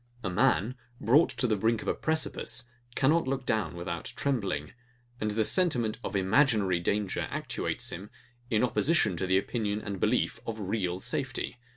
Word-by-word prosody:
A 95 Hz, -, -1 dB
man, 125 Hz, +2 st, +2 dB, 0.3 s
brought 145 Hz, +8 st, +5 dB
to -, -, -1 dB
the 110 Hz, -3 st, +2 dB
brink 110 Hz, +2 st, +1 dB
of -, -, -10 dB
a -, -, +3 dB
precipice, 160 Hz, -4 st, -1 dB, 0.3 s
cannot 155 Hz, +3 st, +3 dB
look 135 Hz, -1 st, -1 dB
down 110 Hz, -6 st, 0 dB
without 85 Hz, -1 st, -4 dB
trembling; 100 Hz, -, -1 dB, 0.5 s
and 105 Hz, -, 0 dB
the 110 Hz, +1 st, +1 dB
sentiment 125 Hz, -, +2 dB
of 100 Hz, -, -4 dB
IMAGINARY 100 Hz, -2 st, +3 dB
danger 100 Hz, +2 st, -1 dB
actuates -, -, -3 dB
him, 100 Hz, +4 st, -7 dB, 0.4 s
in 110 Hz, +1 st, +2 dB
opposition 135 Hz, -, +2 dB
to 95 Hz, -, -1 dB
the 95 Hz, +1 st, +4 dB
opinion 105 Hz, 0 st, -1 dB
and 100 Hz, -3 st, -5 dB
belief 115 Hz, +3 st, +1 dB
of 110 Hz, -1 st, -3 dB
REAL 95 Hz, -3 st, -1 dB
safety. 120 Hz, -, -3 dB
110 Hz, 165 wpm, -29 LUFS, 95-125 Hz, 0.5 s, brought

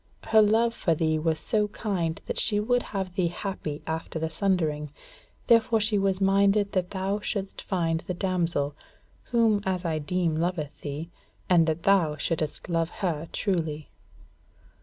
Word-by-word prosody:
Her 220 Hz, -1 st, +5 dB
love 225 Hz, +2 st, +3 dB
for 165 Hz, -7 st, +1 dB
thee 155 Hz, 0 st, +1 dB
was 160 Hz, 0 st, 0 dB
so 210 Hz, +3 st, +1 dB
kind 185 Hz, -6 st, -2 dB
that -, -, -3 dB
she 205 Hz, -2 st, +2 dB
would 245 Hz, +3 st, +2 dB
have 190 Hz, -5 st, -4 dB
thee 180 Hz, -2 st, +1 dB
happy 165 Hz, -4 st, -5 dB
after 160 Hz, 0 st, -4 dB
the 160 Hz, 0 st, -2 dB
sundering: 155 Hz, -6 st, 0 dB, 0.5 s
therefore 230 Hz, -1 st, +4 dB
she 210 Hz, -1 st, +1 dB
was 195 Hz, -1 st, +1 dB
minded 200 Hz, +1 st, +3 dB
that 185 Hz, -3 st, 0 dB
thou 195 Hz, +1 st, -1 dB
shouldest 200 Hz, -2 st, -3 dB
find 165 Hz, -4 st, 0 dB
the 180 Hz, -, -5 dB
damsel, 170 Hz, -6 st, 0 dB, 0.5 s
who 225 Hz, -4 st, +3 dB
as 185 Hz, -2 st, -2 dB
I 160 Hz, -2 st, 0 dB
deem 170 Hz, +1 st, 0 dB
loveth 165 Hz, -3 st, -2 dB
thee, 150 Hz, +4 st, -5 dB, 0.4 s
and 165 Hz, -2 st, +5 dB
that 160 Hz, +1 st, -1 dB
thou 175 Hz, -7 st, +3 dB
shouldest 155 Hz, 0 st, -2 dB
love 165 Hz, -2 st, 0 dB, 0.2 s
her 165 Hz, -2 st, -1 dB
truly." 160 Hz, -7 st, -2 dB
180 Hz, 160 wpm, -27 LUFS, 160-200 Hz, 0.5 s, Her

